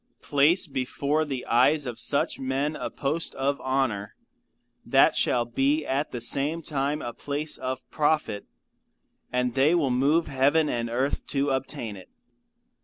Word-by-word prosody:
Place 150 Hz, +6 st, +3 dB
before 145 Hz, +2 st, -1 dB
the 135 Hz, -4 st, -4 dB
eyes 145 Hz, +5 st, +3 dB
of 120 Hz, -2 st, -5 dB
such 140 Hz, -, +1 dB
men, 135 Hz, +3 st, -1 dB
a -, -, -4 dB
post 150 Hz, +4 st, -2 dB
of 140 Hz, +1 st, -1 dB
honour 130 Hz, -7 st, -1 dB, 0.7 s
that -, -, +4 dB
shall 120 Hz, -1 st, +2 dB
be 140 Hz, +6 st, +1 dB
at 140 Hz, +3 st, -1 dB
the 120 Hz, -, -5 dB
same 145 Hz, +7 st, -1 dB
time 145 Hz, 0 st, -2 dB
a 120 Hz, -, -5 dB
place 145 Hz, +4 st, -3 dB
of 130 Hz, 0 st, -5 dB
profit, 150 Hz, -9 st, 0 dB, 0.8 s
and 125 Hz, -1 st, 0 dB
they 140 Hz, +6 st, +3 dB
will 145 Hz, -7 st, +1 dB
move 145 Hz, +6 st, +2 dB
heaven 145 Hz, +3 st, +2 dB
and 115 Hz, -1 st, -2 dB
earth 130 Hz, +4 st, -1 dB
to 140 Hz, 0 st, 0 dB
obtain 130 Hz, -5 st, -3 dB
it. 95 Hz, -, -13 dB
135 Hz, 150 wpm, -26 LUFS, 125-150 Hz, 0.8 s, that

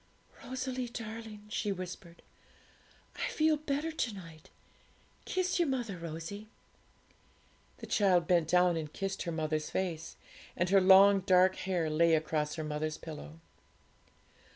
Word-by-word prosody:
'Rosalie 255 Hz, -1 st, -4 dB
darling,' 220 Hz, -2 st, -8 dB
she 210 Hz, -1 st, -1 dB
whispered, 180 Hz, -2 st, -8 dB, 0.9 s
'I -, -, -1 dB
feel 310 Hz, 0 st, +2 dB
better 300 Hz, +1 st, -2 dB
to 255 Hz, -8 st, -2 dB
night. 165 Hz, -4 st, -12 dB, 0.8 s
Kiss 370 Hz, -1 st, 0 dB
your 340 Hz, -, +3 dB
mother, 245 Hz, -7 st, -2 dB
Rosie.' 165 Hz, +6 st, -7 dB, 1.3 s
The -, -, -8 dB
child 185 Hz, -5 st, +3 dB
bent 170 Hz, -3 st, +2 dB
down 180 Hz, 0 st, +3 dB
and 155 Hz, -2 st, -5 dB
kissed 195 Hz, +2 st, -4 dB
her 170 Hz, -, -3 dB
mother's 155 Hz, -1 st, -2 dB
face, 170 Hz, -4 st, -3 dB, 0.4 s
and 175 Hz, +1 st, +1 dB
her 195 Hz, -1 st, +6 dB
long 195 Hz, +1 st, +7 dB
dark 185 Hz, 0 st, +4 dB
hair 180 Hz, -4 st, -1 dB
lay 165 Hz, +1 st, +3 dB
across 155 Hz, -1 st, -1 dB
her 160 Hz, -, -4 dB
mother's 155 Hz, +1 st, -3 dB
pillow. 80 Hz, -, -9 dB
185 Hz, 130 wpm, -32 LUFS, 160-215 Hz, 1.3 s, long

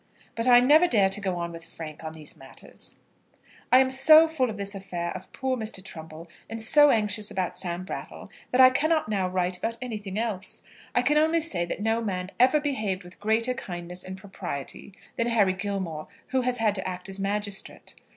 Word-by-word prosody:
But 230 Hz, +2 st, -1 dB
I 245 Hz, -1 st, +8 dB
never 305 Hz, +7 st, +6 dB
dare 205 Hz, -, +3 dB
to 200 Hz, +2 st, 0 dB
go 190 Hz, -2 st, -1 dB
on 170 Hz, 0 st, -4 dB
with 165 Hz, 0 st, -9 dB
Frank 160 Hz, -1 st, -9 dB
on 160 Hz, 0 st, -6 dB
these 155 Hz, -2 st, -6 dB
matters. 135 Hz, 0 st, -8 dB, 0.8 s
I 255 Hz, -, +8 dB
am 260 Hz, 0 st, +4 dB
so 310 Hz, +5 st, +8 dB
full 280 Hz, -6 st, 0 dB
of 215 Hz, -, -6 dB
this 200 Hz, 0 st, 0 dB
affair 180 Hz, -3 st, -4 dB
of -, -, -9 dB
poor 265 Hz, -1 st, -2 dB
Mr. 215 Hz, -5 st, -4 dB
Trumbull, 160 Hz, -1 st, -9 dB, 0.2 s
and 225 Hz, -, -5 dB
so 290 Hz, +7 st, +6 dB
anxious 210 Hz, -3 st, +1 dB
about 185 Hz, -2 st, -2 dB
Sam 175 Hz, -1 st, -2 dB
Brattle, 185 Hz, -, -8 dB, 0.2 s
that 250 Hz, -, 0 dB
I 255 Hz, 0 st, +9 dB
cannot 310 Hz, -2 st, +1 dB
now 195 Hz, -3 st, 0 dB
write 180 Hz, 0 st, -1 dB
about 230 Hz, +3 st, -3 dB
anything 210 Hz, -6 st, -5 dB
else. 215 Hz, -4 st, -3 dB, 0.3 s
I 245 Hz, -, +3 dB
can 295 Hz, +4 st, +3 dB
only 320 Hz, +2 st, +3 dB
say 185 Hz, -, -1 dB
that 185 Hz, +4 st, -5 dB
no 225 Hz, +1 st, +1 dB
man 185 Hz, -3 st, -3 dB
ever 255 Hz, +5 st, +5 dB
behaved 215 Hz, -10 st, -2 dB
with 180 Hz, +1 st, -15 dB
greater 225 Hz, +4 st, +2 dB
kindness 180 Hz, -4 st, -6 dB
and 190 Hz, 0 st, -7 dB
propriety 190 Hz, -4 st, -7 dB, 0.3 s
than 230 Hz, -, +1 dB
Harry 210 Hz, -5 st, +3 dB
Gilmore, 185 Hz, -5 st, -4 dB, 0.2 s
who 260 Hz, -1 st, +1 dB
has 250 Hz, 0 st, 0 dB
had 220 Hz, -3 st, +2 dB
to 190 Hz, -2 st, -4 dB
act 180 Hz, 0 st, -5 dB
as 195 Hz, 0 st, -2 dB
magistrate. 200 Hz, 0 st, -3 dB
205 Hz, 200 wpm, -26 LUFS, 185-250 Hz, 0.8 s, I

